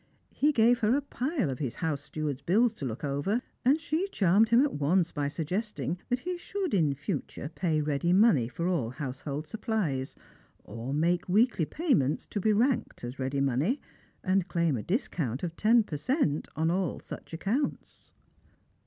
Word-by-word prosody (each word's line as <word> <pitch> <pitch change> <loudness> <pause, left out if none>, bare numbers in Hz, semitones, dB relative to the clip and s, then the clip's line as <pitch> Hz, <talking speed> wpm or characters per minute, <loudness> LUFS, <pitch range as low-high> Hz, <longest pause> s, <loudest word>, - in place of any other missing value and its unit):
He 295 +2 +3
gave 240 -2 +4
her 220 +3 +3
a - - 0
pile 265 - -1
of 130 - -5
his 130 -6 -3
house 155 -5 -2
steward's 145 -2 -4
bills 215 - +3
to 145 - -6
look 120 +1 -5
over, 145 - 0 0.2
and 270 +5 +4
she 330 +3 -1
charmed 210 - +3
him 235 +3 +6
at 290 - 0
once 165 +4 +2
by 145 -1 -1
suggesting 180 +3 -3
that 250 0 0
he 360 +3 -3
should, 380 -2 -3
in 155 -7 +2
future, 140 +1 -4
pay 160 -4 0
ready 150 +3 0
money 185 - +5
for 170 +8 -3
all 165 -11 0
household 140 +3 -5
supplies 170 - -2 0.3
— - - -34
or 115 +4 -6
make 170 +5 +1
weekly 210 -3 +3
payments, 235 - +1
to 205 - -4
be 215 - +3
ranked 235 - +1
as 120 +3 -6
ready 135 +1 -1
money 140 - +1 0.2
— - - -35
and 185 -1 +1
claim 170 -6 +1
a 115 - -3
discount 155 - -2
of 170 -2 -3
ten 225 +4 +4
percent 155 - -1
n 160 +1 +2
all 185 0 -1
such - - -10
accounts. 210 - -3
175 Hz, 180 wpm, -29 LUFS, 145-230 Hz, 0.3 s, him